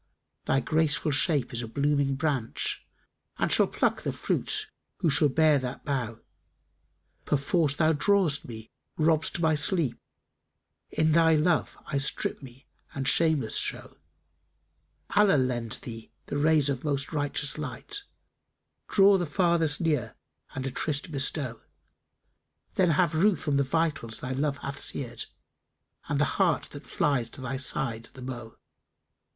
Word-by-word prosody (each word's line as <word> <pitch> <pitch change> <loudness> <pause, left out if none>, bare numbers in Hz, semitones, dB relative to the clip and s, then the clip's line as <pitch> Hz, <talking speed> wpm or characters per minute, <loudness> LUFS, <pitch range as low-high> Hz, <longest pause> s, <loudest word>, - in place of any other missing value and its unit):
Thy 135 - +2
graceful 155 +2 +1
shape 140 -1 +1
is 120 - -1
a 115 - -5
blooming 140 +2 +1
branch, 135 -5 -2 0.2
* - - -43
And - - 0
shall - - +5
pluck - - 0
the - - -2
fruits - - -1 0.3
who 160 - +1
shall 145 +1 +4
bear 155 0 +4
that 130 0 -6
bough. 125 -6 -3 1.0
Perforce 145 +1 +1
thou 160 +1 +3
drawest 170 -2 +2
me, 110 -2 -9 0.3
robst 160 +1 +1
my 160 -1 +3
sleep; 150 - 0 0.5
* - - -54
In 160 0 +4
thy 160 0 +5
love 155 +1 +1
I 140 - -1
strip 140 - -1
me 130 0 -13 0.3
and 135 -1 -2
shameless 155 -7 +3
show:[FN#291] - - -6
Allah 205 -7 +6
lend 120 -4 -1
thee 115 -2 -9
the 145 - -3
rays 150 -1 +3
of 135 -3 -2
most 140 0 -2
righteous 145 0 -1
light, 150 - -4 0.5
* - - -53
Draw 195 -1 +6
the 175 - -2
farthest 165 -1 +1
near 150 -9 0 0.4
and 135 0 -3
a 135 - -2
tryst 150 +4 -1
bestow: 140 -3 -1 1.1
Then 185 -2 +3
have 165 +1 +2
ruth 180 +1 +2
on 140 -1 +2
the 140 - +3
vitals 145 -5 -1
thy 130 - -5
love 140 +2 -1
hath 140 +1 -5
seared, 120 -4 -4 0.4
* - - -29
And - - 0
the - - +4 0.2
heart - - +3
that - - -10
flies 130 -6 0
to 130 - -8
thy 130 +1 -3
side 120 -3 -2
the 130 - -10
mo'e!" 120 -3 -7
145 Hz, 150 wpm, -27 LUFS, 130-160 Hz, 1.1 s, Allah